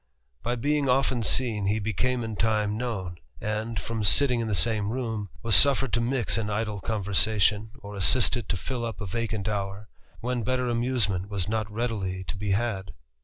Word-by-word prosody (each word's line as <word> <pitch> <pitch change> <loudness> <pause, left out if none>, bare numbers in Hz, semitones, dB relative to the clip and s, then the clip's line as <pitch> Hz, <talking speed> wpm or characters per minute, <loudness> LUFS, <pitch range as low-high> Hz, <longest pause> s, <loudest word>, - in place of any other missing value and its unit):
By 120 +5 -1
being 145 +3 0
often 130 -1 +2
seen, 110 -3 +1
he 105 +2 +2
became 115 +4 -1
in 110 -1 -4
time 105 -1 +1
nown; 95 -8 -4 0.2
and, 110 +2 -3
from 115 +1 -4
sitting 125 +4 +4
in 115 - -2
the 105 - 0
same 105 +4 +2
room, 110 -5 -3
was 115 -2 +4
suffered 135 -3 +5
to 120 - +3
lix 120 -1 +1
in 105 -1 -2
idle 105 0 -2
conversation, 105 +1 +1
or 100 0 -8
assisted 115 +3 +3
to 100 - 0
fill 125 +6 -4
up 115 -1 -4
a 105 - -4
vacant 110 +1 -3
hour, 100 0 -3 0.3
rhen 125 -1 -1
better 125 +1 0
amusement 115 -6 0
was 100 -3 -2
not 110 -1 -2
readily 105 -5 -3
to 95 - -5
be 100 +1 -4
had. 95 -2 -1
110 Hz, 180 wpm, -26 LUFS, 100-120 Hz, 0.3 s, suffered